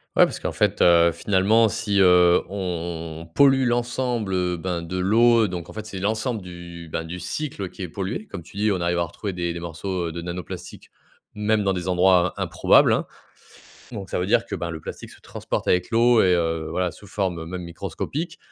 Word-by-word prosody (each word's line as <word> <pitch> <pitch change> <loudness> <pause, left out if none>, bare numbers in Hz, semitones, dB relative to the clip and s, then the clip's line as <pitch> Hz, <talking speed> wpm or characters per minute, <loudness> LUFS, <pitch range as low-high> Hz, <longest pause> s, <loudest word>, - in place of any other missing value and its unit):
Ouais. - - +7
Parce - - -6
qu'en - - -3
fait, - - 0
heu, 85 -1 +6
finalement 105 +5 +3
si, 105 -2 -1
heu, 90 -1 +6
on 85 -4 -5
pollue 135 -2 +5
l'ensemble, 120 -3 -1
heu, 90 -1 0
ben, 85 0 -3
de 85 +2 -5
l'eau 115 +4 +4
donc 90 -3 -6
en - - -10
fait 110 0 -6
c'est 100 -3 -7
l'ensemble 110 +3 -1
du, 85 -2 -10
ben, 80 - -2
du 85 +2 -7
cycle 100 - -4
qui 95 - -8
est - - -3
pollué. 100 - -4
Comme 95 - -7
tu 85 +4 -14
dis 105 +1 +2
on 95 -3 -1
arrive 85 0 0
à - - +2
retrouver 95 +4 -5
des 85 -1 -2
des 85 - -6
morceaux, 85 +2 -4
heu, - - -4
de 85 +1 -6
nanoplastiques 85 -1 -7 0.5
même 105 0 +1
dans 95 -1 +1
des 90 -1 -4
endroits 90 0 +3
improbables, - - +4
hein. - - 0 0.9
Donc 100 -5 -7
ça - - -1
veut 90 - -1
dire - - +3
que, - - -8
ben, 85 - -4
le 80 -1 -5
plastique - - -8
se - - -16
transporte - - -5
avec 90 0 +2
l'eau 120 0 +4
et, 90 -1 +4
heu, 80 -2 -1
voilà 90 +2 -1
sous 105 - -15
forme, 95 -3 -2
heu, 80 - -6
même 90 +1 -5
microscopique. 100 - -5
90 Hz, 215 wpm, -23 LUFS, 85-105 Hz, 0.9 s, Ouais